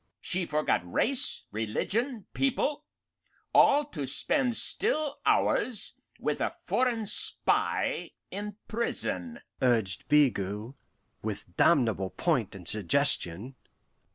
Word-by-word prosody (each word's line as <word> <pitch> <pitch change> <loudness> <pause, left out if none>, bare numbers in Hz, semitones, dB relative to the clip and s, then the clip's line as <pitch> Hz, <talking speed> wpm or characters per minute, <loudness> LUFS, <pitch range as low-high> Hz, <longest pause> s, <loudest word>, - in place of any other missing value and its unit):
"She 180 -2 -1
forgot 150 - +1
race, 265 - 0
religion, 205 - -1
people 280 +3 0 0.7
all, 290 +1 +6
to 145 - -4
spend 245 - +1
still 310 - -1
hours 245 -4 +1 0.3
with - - -1
a - - -1
foreign 240 -4 +1
spy 205 - 0 0.2
in 205 0 -5
prison," 235 +1 -2 0.2
urged 115 -8 +2
Bigot, 115 -6 +2 0.5
with 100 -4 -6
damnable 110 - +3
point 125 - 0
and 90 -3 -8
suggestion. 100 +2 +2
155 Hz, 100 wpm, -29 LUFS, -, 0.7 s, all